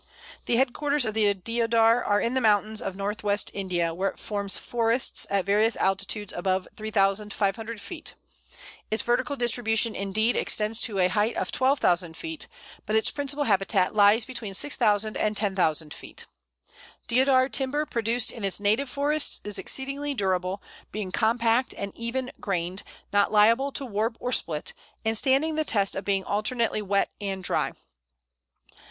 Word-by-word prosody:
The 235 - +2
headquarters 275 +2 +1
of 215 - -2
the 210 -2 +3
Deodar 230 +3 +2
are 205 0 +2
in 235 - -1
the 260 - +1
mountains 215 -1 +2
of 195 - -4
north 205 +2 -4
west 205 0 0
India, 175 -4 -1
where 190 +3 0
it - - -12
forms 200 -2 -2
forests 235 +1 0
at 200 -2 0
various 210 +3 +3
altitudes 195 +2 0
above 185 +1 -1
3500 210 +1 0
feet. 320 - -7 0.7
Its 220 0 0
vertical 245 +3 0
distribution, 230 -2 +2
indeed, 215 +4 0
extends 215 +1 +2
to 210 -4 -1
a 180 -1 +4
height 210 +4 0
of - - -2
12,000 180 - +1
feet, 325 -1 -6 0.4
but 215 - 0
its 220 - +2
principal 285 0 -1
habitat 195 -4 +1
lies 210 +2 +5
between 235 -6 -6
6000 215 -5 +2
and 215 -1 0
10,000 165 -7 0
feet. - - -9 0.8
Deodar 260 +1 +4
timber 275 +3 0
produced 235 -1 0
in 225 - -9
its 195 0 0
native 215 +7 +1
forests 290 +2 0
is 210 -1 -3
exceedingly 275 +2 -2
durable, 190 -2 -1 0.3
being 205 -3 -4
compact 230 +3 +1
and 200 0 -5
even 250 +3 -3
grained, 185 0 -2 0.3
not 205 0 +3
liable 230 +6 +4
to 275 - -4
warp 225 0 -2
or 250 - -3
split, 155 -10 -1 0.3
and 220 0 +1
standing 275 +7 +2
the 310 0 0
test 200 -8 +1
of 195 - -3
being 195 -1 0
alternately 215 +2 0
wet 200 -1 0
and 195 -2 -3
dry. - - 0
215 Hz, 155 wpm, -26 LUFS, 200-245 Hz, 0.8 s, lies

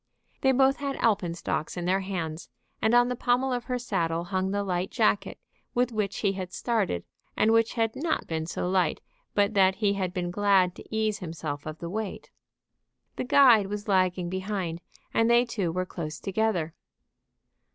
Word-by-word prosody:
They 265 - +4
both 265 +1 +4
had 280 -1 -3
alpenstocks 180 -6 -1
in 175 - -3
their 185 +2 +2
hands, 175 -4 -4 0.3
and 220 +2 +3
on 245 0 +6
the 250 - -2
pommel 250 +2 +1
of 245 -1 -3
her 250 - -1
saddle 170 -8 -1
hung 185 +1 -1
the 200 +1 -1
light 180 -1 -1
jacket 215 -3 +1 0.4
with 245 0 +2
which 205 -4 -2
he 200 - +2
had 185 -2 -5
started, 205 - -1 0.3
and 220 - +4
which 225 0 +3
had 225 -1 0
not 315 +4 -1
been 160 -1 -3
so 175 - -3
light 185 0 +1 0.4
but 205 +1 +3
that 190 -2 +4
he 205 0 +1
had 190 -3 -2
been 180 -2 -3
glad 195 -2 +3
to - - -12
ease 220 -1 0
himself 160 -5 -5
of 155 0 -5
the 170 - -6
weight. 210 +2 -5 0.9
The - - -1
guide 245 -6 +6
was 205 +1 -5
lagging 185 -2 +2
behind, 185 -2 -3 0.3
and 225 0 +3
they 240 +1 +5
two 200 -8 -2
were 185 +2 -1
close 155 -4 -6
together. 195 -5 -1
195 Hz, 180 wpm, -27 LUFS, 180-225 Hz, 0.9 s, on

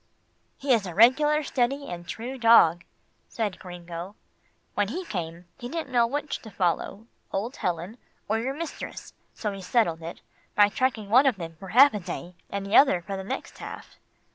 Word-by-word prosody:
"He 275 -2 +2
is 215 -5 +1
a 175 - -7
regular 295 +8 +5
steady 275 +1 0
and 175 -1 -7
true 255 +4 -6
dog," 175 -8 +6 0.4
said 210 -6 -3
Gringo. 175 +1 -8 0.6
"When 205 -1 +1
he 350 - -4
came, 175 - -5
he 245 -1 -6
didn't 315 -3 -4
know 240 -2 +4
which 290 +4 -3
to 220 - -11
follow, 195 +3 -1 0.3
old 225 +7 -3
Ellen, 180 +6 -3 0.3
or 220 +2 +1
your 265 +4 -2
mistress, 330 +1 -7 0.2
so 210 - -3
he 195 -1 -7
settled 180 -5 +1
it, 165 +1 -8 0.3
by 205 0 +6
tracking 225 -4 -1
one 260 +4 +6
of 260 - +3
them 165 -3 -7
for 195 - -9
half 255 +7 +7
a 210 - -2
day, 180 -1 -6 0.2
and 200 0 -4
the 200 - 0
other 190 -11 +6
for 195 +1 -5
the 190 - -5
next 190 - -6
half." - - -9
210 Hz, 185 wpm, -26 LUFS, 180-255 Hz, 0.6 s, half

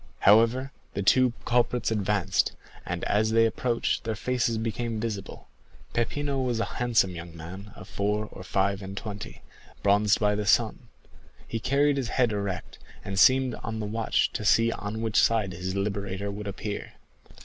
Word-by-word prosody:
However, 115 +6 +4 0.2
the 100 - -1
two 125 +4 +4
culprits 120 -1 +1
advanced, 100 -3 +1 0.3
and - - -3
as 110 +1 +2
they 115 +1 +4
approached 115 +1 0
their 110 -2 -2
faces 120 0 0
became 115 0 -2
visible. 105 -3 -5 0.5
Peppino 135 +4 -1
was 125 -3 0
a - - +1 0.2
handsome 115 -6 +3
young 85 0 -9
man 95 +6 -9
of 95 - -11
four 105 +1 -1
or - - -9
five 100 +1 0
and 95 0 -7
twenty, 105 -1 -7 0.4
bronzed 100 +1 +4
by 105 -1 +2
the 105 0 -2
sun; - - +2 0.6
he 115 - -3
carried 140 +4 +2
his 130 -3 -1
head 125 -3 +2
erect, 100 -4 -4 0.3
and 95 -1 -2
seemed 130 +2 +5
on 110 0 -4
the 105 - -3
watch 110 +2 0
to - - -3
see 115 +2 +4
on 110 +1 -4
which 110 -2 +3
side 110 -5 +2
his 90 +2 -4
liberator 100 0 -2
would 105 +1 -6
appear. 105 +1 -5
105 Hz, 165 wpm, -27 LUFS, 100-115 Hz, 0.6 s, seemed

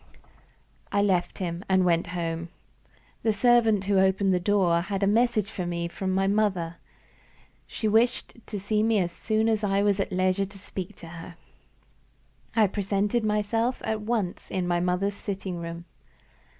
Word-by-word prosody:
I 200 - +2
left 185 -3 +1
him, 175 -1 -4
and 190 -1 +4
went 170 -1 +2
home. 165 0 -3 0.7
The 225 - +2
servant 225 -1 +4
who 200 -1 +3
opened 190 0 +3
the 180 - +2
door 175 -3 +2
had 195 +2 -3
a - - +5
message 220 0 +2
for 180 -2 -4
me 170 0 -2
from 190 +2 -3
my 190 +1 +1
mother. 195 -5 0 0.9
She 220 - -3
wished 225 +3 +2
to 205 - -4
see 210 +2 0
me 225 0 +3
as 175 -3 0
soon 220 +5 0
as 220 -1 +1
I 200 0 +2
was 205 -1 +2
at 195 - -1
leisure 185 +1 +1
to 200 +1 -13
speak 190 0 -7
to 170 - -12
her. 170 +1 -9 1.2
I 220 -2 +5
presented 205 +3 0
myself 215 +3 0
at 220 -1 -1
once 210 -5 -2
in 185 -2 -2
my 175 0 +1
mother's 180 +3 0
sitting 195 -3 -5
room. 170 0 -6
195 Hz, 165 wpm, -26 LUFS, 180-210 Hz, 1.2 s, a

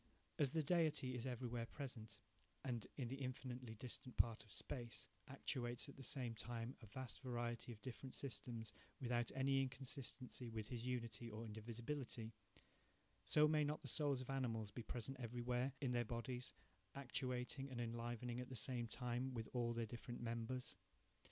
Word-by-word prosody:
As 145 -3 +6
the 160 +3 +3
Deity 155 -5 +4
is 125 +1 -1
everywhere 120 -2 0
present, 115 -8 -4 0.5
and, 120 -4 0
in 130 -4 0
the 135 +3 -3
infinitely 125 -2 -2
distant 125 +2 -5
part 115 -2 +5
of 105 - -16
space, 120 -2 -2 0.2
actuates 125 -2 0
at 140 - -8
the 135 - -8
same 125 -3 +2
time 115 +2 -2
a 110 - -8
vast 130 +5 -4
variety 120 -2 -1
of 110 -2 -9
different 130 +1 -4
systems 120 -4 -2 0.3
without 120 -2 +3
any 135 0 +5
inconsistency 130 -1 -2
with 110 -1 -3
his 120 -1 -2
unity 115 -2 -1
or 110 +1 -4
indivisibility; 115 +2 -3 0.9
so 150 0 +8
may 150 0 +5
not 150 +1 +1
the - - -4
souls 145 -4 +4
of 130 - -3
animals 115 -6 +1
be 120 - -3
present 125 +3 -2
everywhere 125 +2 +1
in 130 -3 +3
their 120 -1 +4
bodies, 120 +2 -2 0.4
actuating 130 0 0
and 125 -2 -3
enlivening 120 +1 -1
at 125 - -3
the 130 - -4
same 120 +1 +1
time 125 +2 0
with 115 -1 -1
all 120 -2 +3
their 115 0 +1
different 120 +2 -4
members? 115 0 -1
125 Hz, 165 wpm, -46 LUFS, 115-130 Hz, 0.9 s, so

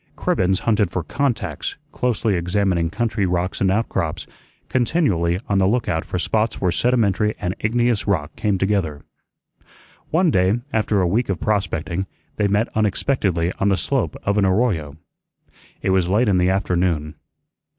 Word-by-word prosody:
Cribbens 95 0 +1
hunted 105 -4 +2
for 95 - -3
"contacts," 135 - -2
closely 115 -3 0
examining 90 -1 +1
country 105 -1 -1
rocks 90 +1 -1
and 95 - +3
out 110 +4 +1
crops, - - -2 0.4
continually 105 - +1
on 100 -1 +2
the 95 - +3
lookout 100 -7 0
for - - -3
spots 110 +5 0
where 90 -2 +1
sedimentary 105 -2 +1
and 90 +1 -2
igneous 120 0 +1
rock 95 -7 -1
came 105 -3 0
together. 95 -7 -1 1.1
One 170 +1 +3
day, 95 +3 +2
after 105 -2 +1
a 90 - +2
week 110 +7 0
of 95 -4 -1
prospecting, 95 -3 -1 0.3
they 105 - +2
met 105 +3 +1
unexpectedly 100 -5 0
on 100 - +2
the 95 - +2
slope - - -1
of 100 +1 +1
an 100 - +3
arroyo. 95 - 0 0.9
It 95 - +1
was 95 -2 +2
late 110 +5 +3
in 95 -3 +3
the 90 +1 +3
afternoon. 90 -5 0
100 Hz, 155 wpm, -21 LUFS, 90-110 Hz, 1.1 s, and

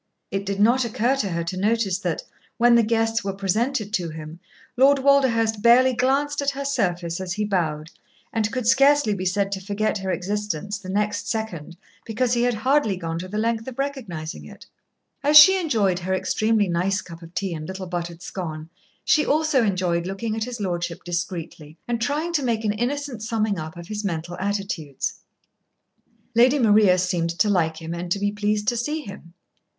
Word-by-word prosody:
It 195 0 -3
did 200 0 -2
not 240 +5 +4
occur 235 +3 +1
to 205 -7 -1
her 170 -1 -2
to 170 +2 -4
notice 205 -2 +1
that, 360 - -2 0.3
when 240 0 +5
the 235 - +6
guests 225 0 0
were 195 -1 -3
presented 215 +3 -1
to 175 -6 -1
him, 155 +1 -9 0.4
Lord 275 +3 +5
Walderhurst 250 -6 +3
barely 250 +3 +6
glanced 275 +4 +1
at 280 - +1
her 280 0 -4
surface 180 -10 -1
as 180 -2 -3
he 210 +2 -1
bowed, 160 -6 -2 0.4
and 220 -1 0
could 255 -3 -3
scarcely 275 -1 +4
be 185 -2 -4
said 195 +1 0
to 195 -1 -3
forget 205 +2 -1
her 190 0 -4
existence 205 +1 -3
the 185 -2 -10
next 210 +2 -1
second, 180 -7 -4 0.3
because 235 +2 0
he 240 - +1
had 245 -1 +2
hardly 225 -3 +1
gone 165 -2 -4
to 185 - -6
the 205 +3 -5
length 225 +1 -1
of 260 -1 -7
recognising 190 - -4
it. 75 - -13 0.6
As 295 +2 +6
she 380 +6 +9
enjoyed 215 - +1
her 190 +1 -1
extremely 215 +2 +1
nice 185 +3 0
cup 170 -2 -10
of 165 +1 -13
tea 195 -3 -2
and 155 -1 -6
little 190 0 -6
buttered 175 -1 -5
scone, 160 -4 -6 0.4
she 305 - +4
also 305 -4 +2
enjoyed 180 -4 0
looking 215 +3 -3
at 220 0 -2
his 245 -2 -6
Lordship 175 -3 -3
discreetly, 170 -3 -5
and 235 -1 -2
trying 300 +7 -1
to 305 - +2
make 230 -4 -1
an 205 - +1
innocent 250 +1 -3
summing 220 -4 -1
up 160 +1 -7
of 170 -1 -9
his 210 +1 -4
mental 175 -2 -3
attitudes. 195 -8 -3 1.2
Lady 250 +5 +5
Maria 210 -6 +5
seemed 180 -2 0
to 210 - +3
like 160 -4 +1
him 165 0 -6
and 175 +1 -5
to 200 - +2
be 205 0 0
pleased 210 0 -1
to 240 - -2
see 300 +7 -2
him. 190 - -11
205 Hz, 190 wpm, -23 LUFS, 180-240 Hz, 1.2 s, she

